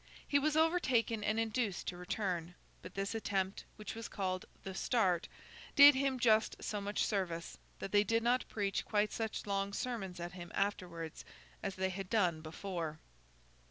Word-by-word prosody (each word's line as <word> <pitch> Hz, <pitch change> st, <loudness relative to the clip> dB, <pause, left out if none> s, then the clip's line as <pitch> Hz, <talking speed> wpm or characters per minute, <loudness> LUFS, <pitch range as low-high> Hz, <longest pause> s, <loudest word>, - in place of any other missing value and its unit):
He 285 Hz, -, +4 dB
was 305 Hz, +2 st, +1 dB
overtaken 265 Hz, -10 st, +2 dB
and 215 Hz, +1 st, +1 dB
induced 225 Hz, -3 st, -1 dB
to 180 Hz, -, -6 dB
return; 180 Hz, -2 st, -2 dB, 0.3 s
but -, -, -10 dB
this 195 Hz, +2 st, -1 dB
attempt, 195 Hz, -3 st, -1 dB
which 210 Hz, -, -6 dB
was 225 Hz, -1 st, -6 dB
called 185 Hz, -2 st, -2 dB, 0.2 s
'The 190 Hz, -, -5 dB
Start,' 190 Hz, -5 st, +1 dB, 0.5 s
did 285 Hz, +1 st, +11 dB
him 270 Hz, 0 st, +1 dB
just 220 Hz, -2 st, +4 dB
so 210 Hz, -1 st, -3 dB
much 205 Hz, +1 st, 0 dB
service, 175 Hz, -5 st, -2 dB, 0.2 s
that 195 Hz, -, -5 dB
they 205 Hz, 0 st, +5 dB
did 230 Hz, +2 st, +1 dB
not 245 Hz, +2 st, +2 dB
preach 200 Hz, -2 st, -1 dB
quite 210 Hz, 0 st, +1 dB
such 225 Hz, -1 st, -3 dB
long 200 Hz, 0 st, -1 dB
sermons 195 Hz, -7 st, -3 dB
at 175 Hz, 0 st, -4 dB
him 175 Hz, -2 st, -9 dB
afterwards 175 Hz, -5 st, -2 dB, 0.4 s
as 195 Hz, -2 st, -3 dB
they 190 Hz, 0 st, 0 dB
had 195 Hz, 0 st, -5 dB
done 180 Hz, -8 st, +2 dB
before. 165 Hz, -1 st, -4 dB
200 Hz, 165 wpm, -35 LUFS, 185-225 Hz, 0.5 s, did